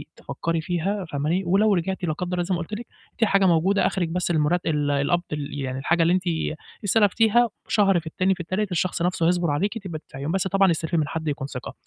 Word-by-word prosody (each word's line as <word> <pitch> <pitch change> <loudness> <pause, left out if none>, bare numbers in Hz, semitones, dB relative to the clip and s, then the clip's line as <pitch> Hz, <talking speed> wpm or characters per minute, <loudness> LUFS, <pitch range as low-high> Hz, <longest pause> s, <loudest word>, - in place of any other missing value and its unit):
تفكّري 165 -1 -3
فيها 185 +3 -2
فاهماني، 155 +6 -1
ولو 200 +4 +3
رجعتِ 190 +2 -2
لا 155 - 0
قدّر 180 +3 -4
الله 175 - +1
زي 185 +1 -1
ما - - -3
قُلت 170 - -8
لِك، 230 +3 -4 0.3
في 225 - +3
حاجة 195 -2 +3
موجودة 185 +3 +3
آخرك 175 -4 -1
بس 180 0 -1
المرت 160 +3 +1
ال 150 -2 0
القبض 145 +5 +1
ال 145 -1 -4
يعني 130 -1 -3
الحاجة 170 +5 +1
اللي 170 - +3
أنت 185 0 +1 0.6
استلفتيها 225 +3 +3 0.2
شهر 195 -4 +3
في 165 - -11
التاني 185 +4 +1
في - - -20
التالت 185 +3 -2
الشخص 180 0 -1
نفْسه 170 -1 +1
هيصبر 175 -3 +1
عليكِ 200 +10 -1
تبقى 175 -7 -6
تدفعيهم 140 +1 -6
بس 190 0 0
طبعًا 195 -1 +3
استلفي 165 +1 -1
من 155 -2 +1
حد 160 +2 -4
يكون 140 -2 -2
ثقة، 125 -3 -7
175 Hz, 225 wpm, -24 LUFS, 160-195 Hz, 0.6 s, ولو